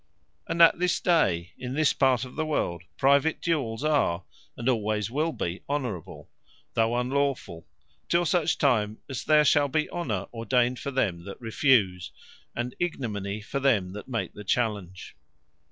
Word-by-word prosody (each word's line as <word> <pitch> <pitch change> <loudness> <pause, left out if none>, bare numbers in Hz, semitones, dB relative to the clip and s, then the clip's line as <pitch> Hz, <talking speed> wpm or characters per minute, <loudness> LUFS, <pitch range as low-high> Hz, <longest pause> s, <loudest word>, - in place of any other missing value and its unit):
And 170 +1 +4
at 165 - +6
this 180 -1 +1
day, 95 - +2
in 125 +1 -5
this 155 -1 +3
part 130 -2 +2
of 125 - -11
the - - -1
world, 90 - -1 0.2
private 140 +4 +3
Duels 135 -8 -1
are, 140 - +1 0.3
and 120 - -4
alwayes 110 -3 0
will 155 +5 0
be 85 - -4
Honourable, 125 - -4 0.5
though 115 +1 +2
unlawfull, 130 -9 -1 0.4
till 175 0 +3
such 165 -3 +1
time 110 -6 +1
as 135 -3 -5
there 150 -1 +4
shall 145 0 +4
be 150 +2 0
Honour 110 - -2
ordained 120 +2 +1
for - - -4
them 100 -11 -1
that 100 - -8
refuse, 110 -6 +2 0.4
and 120 +1 -3
Ignominy 110 - -3
for 140 +6 -4
them 105 -10 +1
that 105 - -8
make 115 -4 -3
the 105 - -9
Challenge. 100 -4 -2
125 Hz, 155 wpm, -27 LUFS, 105-145 Hz, 0.5 s, at